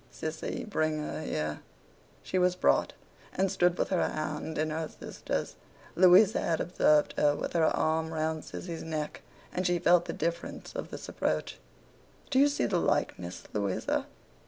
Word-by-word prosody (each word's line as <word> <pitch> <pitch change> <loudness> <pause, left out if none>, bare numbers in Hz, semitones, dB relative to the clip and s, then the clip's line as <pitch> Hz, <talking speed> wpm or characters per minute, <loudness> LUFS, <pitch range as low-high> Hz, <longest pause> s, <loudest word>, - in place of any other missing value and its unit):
Sissy, 155 +7 -4
bring 155 -6 0
her 150 +1 -4
here.' 75 - -2 0.6
She 185 - -1
was 180 0 +3
brought, 180 - +2 0.4
and 190 0 +1
stood 180 -2 +2
with - - 0
her 185 - +1
hand 155 +1 -4
in 155 +1 0
her 160 0 -3
sister's. - - -5 0.4
Louisa 185 +3 +6
had 165 -2 0
observed 150 -3 +3
her 145 -1 +4
with - - -4
her 165 -2 +3
arm 160 +1 +1
round 160 0 -1
Sissy's 170 -3 -6
neck, 155 -2 -4 0.3
and 185 0 0
she 175 0 +2
felt 175 0 +4
the - - -4
difference 170 0 -4
of - - -5
this - - -8
approach. - - -2 0.7
'Do 260 - +4
you 285 - +7
see 290 - 0
the 180 -4 +1
likeness, 90 - -1
Louisa? 100 -3 -1
160 Hz, 160 wpm, -30 LUFS, 155-180 Hz, 0.7 s, you